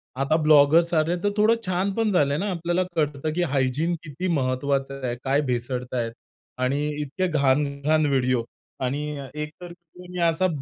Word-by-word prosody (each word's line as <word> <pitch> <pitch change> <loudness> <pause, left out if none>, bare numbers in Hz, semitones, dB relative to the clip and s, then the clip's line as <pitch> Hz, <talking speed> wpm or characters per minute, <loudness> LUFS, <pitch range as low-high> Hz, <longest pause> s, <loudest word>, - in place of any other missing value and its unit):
आता 135 +4 +1
ब्लॉगर्स 155 +3 +5
आले, 160 +2 +2
तर 205 - +3
थोडं 220 +2 +5
छान 185 +2 0
पण 225 -2 +1
झाले 145 -5 +2
ना, 205 +4 -2
आपल्याला 175 +1 0
कळतं 150 0 -1
की 175 +2 0
हायजीन 140 +6 +1
किती 155 +4 -4
महत्वाचं 135 -2 -1
आहे. 120 - -1
काय 140 +2 +2
भेसळतायेत 125 -1 -2 0.5
आणि 140 +3 +1 0.2
इतके 150 +6 -2
घाण-घाण 145 0 +1
व्हिडिओ 130 -4 +1 0.4
आणि 145 +4 -2 0.3
एक 150 0 -4
तर 175 -1 -8 0.4
मी 180 0 -6
असा 175 +3 +1
150 Hz, 155 wpm, -24 LUFS, 135-170 Hz, 0.5 s, ब्लॉगर्स